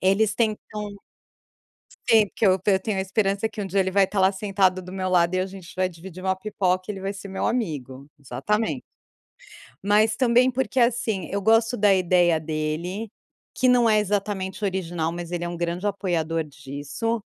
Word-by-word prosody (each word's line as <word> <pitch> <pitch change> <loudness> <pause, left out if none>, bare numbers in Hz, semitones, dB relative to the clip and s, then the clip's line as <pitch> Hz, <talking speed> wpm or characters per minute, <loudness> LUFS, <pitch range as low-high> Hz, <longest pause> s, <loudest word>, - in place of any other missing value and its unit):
Eles 205 +3 +3
tentam 210 -2 -2 1.1
Sim, 220 -2 +6
porque 220 - -1
eu 185 0 +4
eu 190 -2 +4
tenho 200 0 -2
a - - +1
esperança 200 +2 0
que 210 - -6
um - - -3
dia 195 +2 0
ele 190 0 -1
vai 195 0 +4
estar 195 +1 -3
lá, 190 +1 +5
sentado 190 -2 +1
do 180 +1 -10
meu 185 -1 -2
lado, 175 0 +3
e - - +1
a 185 - 0
gente 190 -2 -11
vai 185 0 +1
dividir 185 +2 -11
uma 190 0 +1
pipoca, 185 -2 -1
e - - +1
ele 190 - -8
vai 195 +1 -2
ser 200 0 -9
meu 190 - -3
amigo, 140 - -3
exatamente. 140 - -2 1.0
Mas 215 +2 +4
também 250 +1 +4
porque, 265 +1 -1
assim, 230 -6 +1
eu 200 +1 -1
gosto 225 +3 +3
da 205 -1 +4
ideia 175 -2 +3
dele, 160 +7 -3 0.4
que 255 - +1
não 245 -2 +5
é 215 -1 +4
exatamente 200 -1 -2
original, 175 -4 -1
mas 175 0 -6
ele 175 -1 -2
é - - -3
um 175 - -5
grande 175 +3 -2
apoiador 165 -5 -1
disso: 145 - -4
190 Hz, 190 wpm, -24 LUFS, 175-210 Hz, 1.1 s, Sim